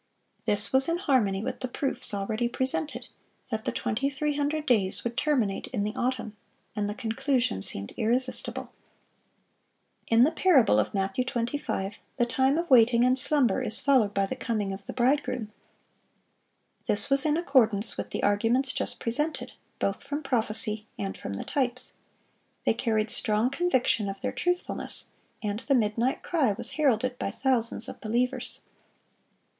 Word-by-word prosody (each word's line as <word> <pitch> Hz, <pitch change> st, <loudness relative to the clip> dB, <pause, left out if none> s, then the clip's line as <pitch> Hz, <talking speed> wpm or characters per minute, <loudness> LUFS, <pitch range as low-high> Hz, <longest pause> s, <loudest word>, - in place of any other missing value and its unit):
This 205 Hz, 0 st, +1 dB
was 265 Hz, +3 st, +5 dB
in 335 Hz, -, +1 dB
harmony 240 Hz, -, +1 dB
with 260 Hz, -, -4 dB
the 255 Hz, -, -3 dB
proofs 270 Hz, +2 st, -3 dB
already 215 Hz, +4 st, -1 dB
presented, 260 Hz, +4 st, -1 dB, 0.4 s
that 220 Hz, -1 st, -3 dB
the -, -, 0 dB
2300 290 Hz, +5 st, -1 dB
days 210 Hz, -8 st, +1 dB
would 235 Hz, 0 st, -3 dB
terminate 255 Hz, -8 st, 0 dB
in 215 Hz, -6 st, -2 dB
the 210 Hz, +1 st, -2 dB
autumn, 245 Hz, -4 st, -2 dB, 0.4 s
and 205 Hz, -1 st, -1 dB
the 210 Hz, -, -4 dB
conclusion 240 Hz, -, -1 dB
seemed 100 Hz, 0 st, +5 dB
irresistible. 250 Hz, +4 st, 0 dB, 1.4 s
In 230 Hz, +1 st, +5 dB
the 300 Hz, -, +4 dB
parable 300 Hz, -, +4 dB
of 105 Hz, -, -1 dB
Matthew 195 Hz, +5 st, 0 dB
25 235 Hz, -5 st, -3 dB, 0.2 s
the 240 Hz, -, +2 dB
time 265 Hz, +4 st, +1 dB
of 340 Hz, +1 st, -1 dB
waiting 240 Hz, -3 st, +5 dB
and 255 Hz, 0 st, +4 dB
slumber 265 Hz, -1 st, +2 dB
is -, -, +3 dB
followed 255 Hz, -8 st, +3 dB
by 195 Hz, -1 st, +1 dB
the 230 Hz, -, -4 dB
coming 215 Hz, -6 st, -2 dB
of 195 Hz, +1 st, -10 dB
the -, -, -4 dB
bridegroom. 250 Hz, -3 st, 0 dB, 1.4 s
This 205 Hz, -, +1 dB
was 275 Hz, 0 st, +6 dB
in 305 Hz, 0 st, +2 dB
accordance 230 Hz, -, +2 dB
with -, -, -5 dB
the -, -, -4 dB
arguments 230 Hz, +6 st, +2 dB
just -, -, -2 dB
presented, 295 Hz, +7 st, -2 dB, 0.3 s
both 195 Hz, -, -1 dB
from 285 Hz, +2 st, -4 dB
prophecy 220 Hz, -3 st, -1 dB
and 195 Hz, -1 st, -4 dB
from 100 Hz, -, -6 dB
the 100 Hz, -, -5 dB
types. 255 Hz, -2 st, -2 dB, 0.7 s
They -, -, +4 dB
carried 220 Hz, -2 st, 0 dB
strong 215 Hz, +4 st, +1 dB
conviction 260 Hz, -, +1 dB
of 195 Hz, 0 st, -7 dB
their -, -, -2 dB
truthfulness; 355 Hz, 0 st, -2 dB, 0.3 s
and 210 Hz, 0 st, -2 dB
the 275 Hz, +2 st, +1 dB
"midnight 230 Hz, +2 st, 0 dB
cry" 285 Hz, -11 st, +1 dB
was -, -, -4 dB
heralded 255 Hz, -4 st, +1 dB
by -, -, -2 dB
thousands 235 Hz, 0 st, 0 dB
of -, -, -8 dB
believers. 240 Hz, +4 st, -1 dB
240 Hz, 155 wpm, -27 LUFS, 215-270 Hz, 1.4 s, was